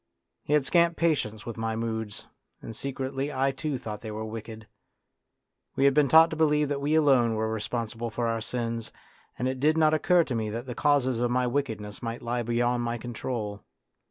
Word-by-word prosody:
He 145 - -2
had 150 -3 +3
scant 170 +3 +3
patience 125 -11 0
with 115 -1 -6
my 115 0 -1
moods, 110 -2 -4 0.3
and 115 - -9
secretly 135 +2 -3
I 135 0 +1
too 140 +1 -3
thought 105 -4 -6
they 110 - -6
were 110 +1 -4
wicked. 110 0 -8 1.1
We 135 - +2
had 140 - +5
been 150 0 +4
taught 160 +5 +7
to - - -3
believe 150 -2 +2
that 140 -1 -2
we 150 +2 +1
alone 130 -7 +4
were 110 0 -1
responsible 115 +1 -3
for 120 +2 -2
our 115 -1 -1
sins, 115 -1 -3 0.5
and 125 - -1
it 130 0 -2
did 155 +4 +3
not 155 -1 +4
occur 175 +3 +4
to 135 - -4
me 110 -2 -1
that 115 +3 -5
the 125 - -5
causes 130 -3 +2
of 120 0 +1
my 125 +1 +1
wickedness 115 -6 -3
might 115 0 -5
lie 120 +1 -1
beyond 120 +1 +1
my 120 0 -2
control. 115 -3 -4
120 Hz, 200 wpm, -27 LUFS, 115-140 Hz, 1.1 s, taught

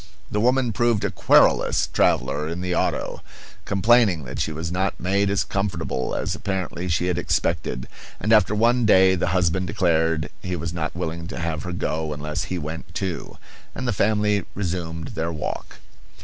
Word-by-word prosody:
The 105 - 0
woman 125 +1 +2
proved 120 -3 +2
a - - -1
querulous - - +4
traveller 70 +4 +1
in 85 +2 -4
the 90 -1 -1
auto, - - -1 0.4
complaining 100 -4 +3
that 60 - -6
she - - 0
was 80 +2 -4
not 95 +2 -1
made 100 +4 +1
as 100 -1 +1
comfortable 95 -9 -2
as - - -1
apparently 90 -2 -3
she 85 +1 +1
had 90 -1 0
expected; 60 -7 -1 0.3
and 110 - +2
after 105 -1 +4
one 120 +3 +3
day 95 -2 +6
the 90 - 0
husband 90 +1 +1
declared 80 -3 +1
he 90 -1 -3
was 85 0 -4
not 80 -2 -3
willing 85 -1 -4
to 100 - -7
have 80 -3 -2
her 90 - -5
go 80 -3 -2
unless 75 +3 -3
he 90 - -3
went 80 +3 -6
too; 95 -3 -4 0.4
and 130 - -3
the 120 - +1
family 105 0 +2
resumed 85 -4 -3
their 80 +1 -3
walk. 75 -2 -5
90 Hz, 175 wpm, -23 LUFS, 80-100 Hz, 0.4 s, day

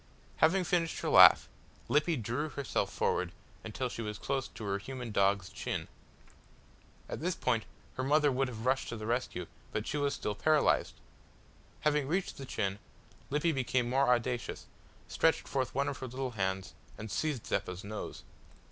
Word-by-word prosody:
Having 180 +5 +4
finished 170 -2 0
her - - -1
laugh, - - +9 0.4
Lippy 150 +2 +2
drew 120 +7 -2
herself 140 -2 -2
forward - - 0 0.3
until 110 +4 -3
she 120 - -5
was 105 -1 -4
close 135 -2 -2
to - - -10
her 100 -1 -1
human 125 +1 -6
dog's 100 -1 +2
chin. - - -4 1.2
At - - -5
this - - 0
point - - 0 0.3
her 130 - -1
mother 145 +1 +4
would 135 +1 +1
have 115 -2 -7
rushed 130 +1 +1
to 115 - -4
the 110 - -6
rescue, 115 -6 -1 0.3
but 105 0 -2
she 150 - -2
was 145 -1 +1
still 105 - -2
paralysed! 155 +9 +2 0.9
Having 150 -2 +2
reached 180 +5 -1
the 135 - -7
chin 100 -3 -2 0.5
Lippy 150 +4 +2
became 130 -3 0
more 135 +2 +3
audacious, 120 0 -1 0.4
stretched - - +2
forth - - -1
one - - +1
of - - -3
her 130 - -5
little 130 +1 -3
hands, 95 -3 -2 0.2
and 110 -1 -7
seized 150 -7 -1
Zeppa's 90 +1 -2
nose. 105 +1 -6
125 Hz, 165 wpm, -32 LUFS, 110-145 Hz, 1.2 s, laugh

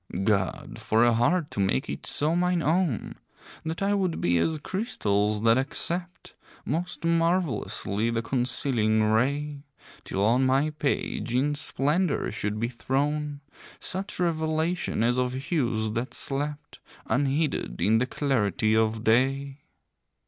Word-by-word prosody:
God 100 -2 0
I - - -10
for 110 +2 +2
a 120 0 +4
heart 150 +8 +1
to - - -5
make 100 +8 +1
it - - -6
so 155 +3 +1
mine 180 -1 +1
own 160 - 0 0.5
That 160 +4 -3
I 200 +1 +2
would 190 -4 0
be 85 -1 +2
as 160 - +1
crystals 105 - -1
that 115 +2 +5
accept 175 +6 -3 0.3
Most 170 +4 -3
marvelously 165 - 0
the 115 0 -1
concealing 120 -3 +1
ray; 140 +7 0 0.4
Till 100 +1 -1
on 120 +4 +3
my 135 +4 +2
page 140 -4 -2
in 145 +4 +2
splendor 150 +3 +1
should 105 0 -3
be 115 - 0
thrown 145 +4 -2 0.4
Such 190 +1 -3
revelation 160 -4 0
as 120 +2 +2
of 125 0 0
hues 125 -6 -1
that 115 +3 -3
slept, 145 +1 -3 0.3
Unheeded, 140 - 0
in 110 +6 +3
the 125 - 0
clarity 110 -6 +1
of 110 0 +1
day! 135 +4 +1
135 Hz, 135 wpm, -26 LUFS, 115-160 Hz, 0.5 s, that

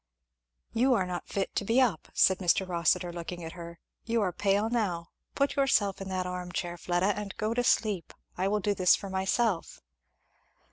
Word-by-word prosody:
"You 250 +2 +3
are 190 - +1
not 180 -1 -5
fit 195 -1 -2
to - - +1
be 230 +5 +2
up," 235 -11 +1
said 190 -1 +4
Mr. 185 +1 +2
Rossitur, 175 0 +1
looking 175 0 -6
at 160 - -6
her, 170 0 -9 0.3
"you 230 0 0
are 185 - 0
pale 200 +3 +1
now, 195 -8 -1 0.2
Put 280 0 +1
yourself 210 -9 +2
in 195 - -5
that 185 -1 -2
arm 180 -1 -5
chair, 175 -1 -3
Fleda, 180 +3 0
and 205 -2 -6
go 220 0 -1
to 245 +1 0
sleep 210 -7 +1 0.2
I 185 +2 0
will 210 +1 0
do 205 +2 +1
this 185 -2 +5
for 195 -2 -7
myself." 190 0 0
190 Hz, 190 wpm, -29 LUFS, 180-215 Hz, 0.3 s, this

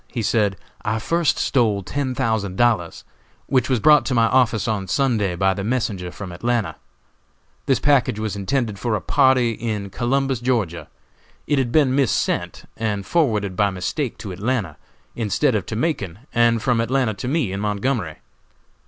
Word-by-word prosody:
He 115 - -4
said: 105 -3 +1 0.3
"I 110 0 0
first 165 +7 +1
stole 110 -7 +1
ten 130 +4 -3
thousand 110 -7 -1
dollars, 110 -7 +1 0.4
which 130 -1 +1
was 130 -3 +2
brought 150 +7 +6
to 130 - 0
my 115 -1 +4
office 120 -4 +2
on 105 -4 -2
Sunday, 110 -5 +1
by 95 +2 +2
the 100 - -5
messenger 105 -6 -2
from 95 +1 -8
Atlanta. 115 +5 -1 0.9
This 135 - +3
package 135 -7 +2
was 110 -1 -3
intended 105 0 -2
for 115 +1 0
a - - -1
party 130 -1 +3
in 110 -3 -4
Columbus, 135 +3 0
Ga. 115 -9 -1 0.6
It 145 -2 +1
had 125 -3 -1
been 140 -3 +3
missent, 135 -5 0
and 105 -3 -2
forwarded 105 - +1
by 100 +1 +2
mistake 100 - -3
to 100 - -7
Atlanta, 100 - -2 0.4
instead 110 +2 +1
of 100 -4 -1
to 110 - -4
Macon, 105 - -2 0.2
and 115 -1 +3
from 120 -3 +2
Atlanta 125 -1 +1
to 100 +4 -6
me 140 - 0
in 100 - -3
Montgomery. 105 - -1
115 Hz, 165 wpm, -21 LUFS, 100-130 Hz, 0.9 s, brought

